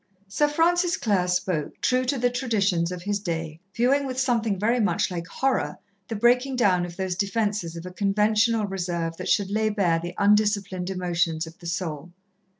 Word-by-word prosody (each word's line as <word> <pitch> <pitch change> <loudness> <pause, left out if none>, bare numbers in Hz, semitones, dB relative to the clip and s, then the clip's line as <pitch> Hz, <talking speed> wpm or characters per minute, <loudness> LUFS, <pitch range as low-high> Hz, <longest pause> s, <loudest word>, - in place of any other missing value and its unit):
Sir 295 +10 +1
Francis 345 +3 +2
Clare 195 -5 +1
spoke, 180 -4 -1
true 255 0 +1
to 270 +2 0
the 245 0 +1
traditions 200 -9 0
of 180 -1 -6
his 205 +1 -1
day, 165 -4 -4 0.2
viewing 270 +4 +2
with 255 -1 -3
something 230 -6 +1
very 230 +6 +1
much 210 -2 +1
like 170 -1 -4
horror 270 +6 -1 0.3
the 225 - -4
breaking 250 +4 +3
down 185 -7 +2
of 175 0 -11
those 190 -1 -1
defences 200 -3 -1
of 170 +1 -7
a 180 - -7
conventional 210 +3 +2
reserve 175 -4 -3
that - - -5
should 200 -2 +2
lay 215 +1 +1
bare 185 -6 +1
the 175 +2 -6
undisciplined 200 -3 +2
emotions 175 -3 -1
of 160 +2 -13
the 170 - -9
soul. 170 -2 -4
200 Hz, 180 wpm, -25 LUFS, 175-235 Hz, 0.3 s, breaking